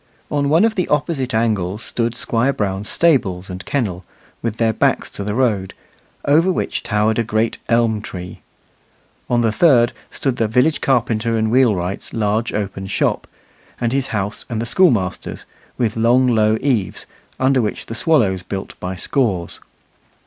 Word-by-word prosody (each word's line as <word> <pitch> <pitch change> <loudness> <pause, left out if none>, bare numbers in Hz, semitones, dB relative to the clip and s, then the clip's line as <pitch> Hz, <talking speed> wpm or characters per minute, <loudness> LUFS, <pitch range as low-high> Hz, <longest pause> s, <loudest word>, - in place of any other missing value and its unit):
On 140 -1 +1
one 165 +8 +5
of 225 - +1
the 185 -5 -1
opposite 145 -3 0
angles 105 -3 0
stood 115 0 -2
Squire 120 +3 +1
Brown's 100 -4 -2
stables 100 - +1
and 90 +2 -7
kennel, 100 -10 -2 0.4
with 115 -1 -3
their 115 -1 +2
backs - - +1
to 100 - -5
the 105 +1 -3
road, 110 -7 0 0.5
over 165 +6 +4
which - - -2
towered 110 -1 +1
a - - +2
great 110 0 -1
elm 115 -2 +2
tree; 90 -3 -8 0.9
on 120 -1 +2
the 115 -2 +2
third 120 -2 +4 0.2
stood 135 -3 -2
the 115 - +1
village 125 +8 +2
carpenter 115 -3 +1
and 110 0 0
wheelwright's 100 -7 +1
large 110 +1 0
open 100 -2 -4
shop, 95 - 0 0.5
and 120 0 0
his 135 -1 0
house 105 -3 -3
and 115 -3 -2
the 115 - -2
schoolmaster's, 115 - +1 0.3
with 115 -3 0
long 120 +3 +3
low 110 -3 +3
eaves, 120 -10 -1 0.3
under 130 0 +3
which 105 - -3
the - - -7
swallows 115 - +2
built 95 +1 -6
by 90 +1 -4
scores. 95 - -1
115 Hz, 160 wpm, -19 LUFS, 105-130 Hz, 0.9 s, one